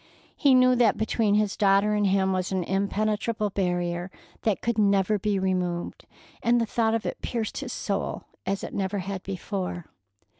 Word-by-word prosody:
He 275 -3 +4
knew 255 0 +5
that 235 -3 +4
between 220 -1 +1
his 210 -1 +1
daughter 200 +1 +3
and 205 -1 +2
him 190 0 +2
was 185 0 -1
an 190 -2 0
impenetrable 210 +3 -1
barrier 175 -1 -1 0.3
that 215 -3 +1
could 235 -2 0
never 200 0 +3
be 205 0 0
removed, 180 -2 -2 0.3
and 240 +1 +3
the 230 - +1
thought 225 0 +1
of 230 - -2
it - - -4
pierced 225 -3 -3
his 275 -3 -5
soul 200 -3 -3 0.2
as 195 +1 -2
it - - -6
never 195 +1 -1
had 195 0 -4
before. 185 -2 -4
200 Hz, 175 wpm, -26 LUFS, 190-220 Hz, 0.3 s, knew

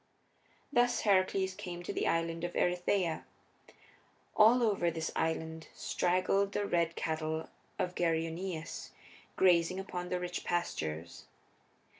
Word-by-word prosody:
Thus 245 -2 +3
Heracles 190 -1 +2
came 175 -2 -7
to - - -4
the - - 0
Island 165 0 0
of 175 - -2
Erytheia. 180 -1 +1 1.1
All 230 +3 +6
over 200 -6 +2
the 160 -1 -3
island 160 0 -2
straggled 190 +3 +1
the 205 - 0
red 170 -3 +1
cattle 160 0 -2 0.3
of 180 - -1
Geryoneus, 165 0 -2 0.5
grazing 180 0 +4
upon 180 -2 -5
the 180 - -1
rich 180 0 -4
pastures. 85 - -3
175 Hz, 115 wpm, -32 LUFS, 165-190 Hz, 1.1 s, All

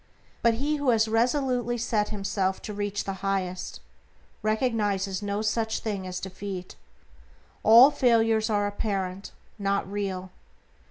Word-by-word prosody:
But 235 -1 +4
he 290 +5 -1
who 285 -2 0
has 225 -2 +3
resolutely 245 +1 +1
set 220 -3 0
himself 195 -2 -1
to 210 - -5
realize 205 0 -2
the 195 - -3
Highest 190 -2 -2 0.6
recognizes 210 -4 0
no 205 +1 -2
such 220 0 0
thing 200 -4 -4
as 180 0 -4
defeat. 190 -1 -6 0.9
All 235 +6 +8
failures 225 -4 +3
are 205 -1 +1
apparent, 195 -2 -3 0.3
not 200 -1 0
real. 190 -2 -4
210 Hz, 125 wpm, -27 LUFS, 195-225 Hz, 0.9 s, All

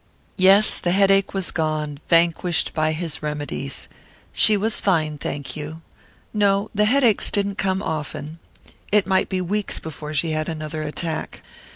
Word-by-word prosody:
Yes, 195 +3 +5
the 175 - 0
headache 195 0 +3
was 190 -2 -1
gone, 155 -3 -2
vanquished 170 0 +2
by 155 0 +1
his 160 -1 -4
remedies. 145 -2 -4 0.5
She 215 -1 +5
was 215 +2 -1
fine, 155 -6 0
thank 140 0 -5
you. 155 +2 -7 0.5
No, 205 0 +1
the 210 0 +2
headaches 240 -2 +4
didn't 200 -1 -1
come 190 +1 0
often. 155 0 -5 0.5
It 210 -1 +4
might 190 0 +1
be 185 -1 -1
weeks 205 +3 -1
before 155 -1 -7
she 160 +3 0
had 155 0 -2
another 155 -1 -5
attack. 155 +1 -4
170 Hz, 150 wpm, -22 LUFS, 155-195 Hz, 0.5 s, Yes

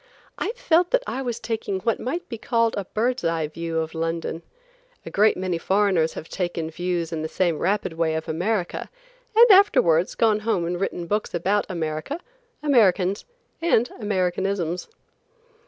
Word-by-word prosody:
I - - -1
felt 355 -8 +2
that - - +2
I 265 - -3
was 240 -3 -3
taking 220 -5 -3
what 230 +2 0
might 335 +8 -3
be 230 - -6
called 230 -1 +1
a 200 - -3
bird's 245 +5 -1
eye 165 -2 0
view 165 +1 -4
of 160 0 -2
London. 165 0 -3 0.6
A - - -7
great 215 +2 +4
many 180 -2 -2
foreigners 190 -4 +2
have 160 - -7
taken 175 -3 -3
views 175 0 -2
in 160 - -2
the 160 - -2
same 170 -2 0
rapid 195 -1 0
way 160 -1 0
of 160 - -4
America, 180 +3 -2 0.5
and 465 0 +8
afterwards 180 - +5
gone 220 -2 +3
home 210 -5 0
and 175 +2 -3
written 175 -3 -2
books 205 +1 -2
about 195 +4 +1
America, 160 - -3 0.4
Americans, 200 -8 +3 0.4
and 250 -8 +2
Americanisms. 185 -3 -1
185 Hz, 160 wpm, -24 LUFS, 165-225 Hz, 0.6 s, and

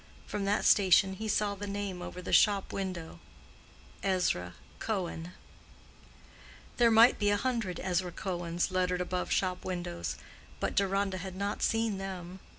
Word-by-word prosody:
From 205 -1 -3
that 205 +1 +1
station 190 -1 +5
he 220 +3 -5
saw 210 -1 +1
the 200 +1 -6
name 200 -2 -4
over 180 +1 -7
the - - -4
shop 200 -2 +4
window—Ezra 180 - -4 0.2
Cohen. 180 -5 -3 1.4
There 235 -1 +5
might 230 +2 +6
be 205 - +2
a 205 - +3
hundred 230 -7 -2
Ezra 180 -1 -1
Cohens 175 -1 -2
lettered 180 -1 +1
above 180 0 -2
shop 185 -1 0
windows, 85 - -4 0.4
but - - -1
Deronda 195 -1 +1
had 190 0 -6
not 200 +2 -3
seen 225 -3 +1
them. 185 -1 -6
190 Hz, 140 wpm, -31 LUFS, 180-205 Hz, 1.4 s, might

